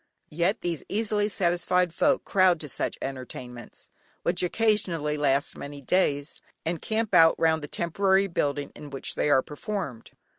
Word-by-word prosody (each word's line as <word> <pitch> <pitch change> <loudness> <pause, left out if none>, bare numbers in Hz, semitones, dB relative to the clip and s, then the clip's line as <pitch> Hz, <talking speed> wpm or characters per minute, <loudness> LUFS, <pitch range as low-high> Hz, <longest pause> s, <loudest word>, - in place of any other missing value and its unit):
Yet 175 +7 0
these 170 -3 -2
easily 210 0 0
satisfied 180 -1 +1
folk - - +2
crowd 185 -3 +4
to 150 - -5
such - - -3
entertainments 125 -3 -8 0.3
(which 175 +1 +1
occasionally 180 -6 +1
last 140 -1 +1
many 145 0 -8
days) 145 -1 0 0.2
and 165 0 -2
camp 220 0 -2
out 165 0 +7
round 160 -1 +3
the 145 - -6
temporary 190 +5 +1
building 145 -6 -2
in 150 - -10
which 135 -1 -3
they - - 0
are 135 -2 +4
performed. 150 - -5
165 Hz, 150 wpm, -26 LUFS, 145-190 Hz, 0.3 s, out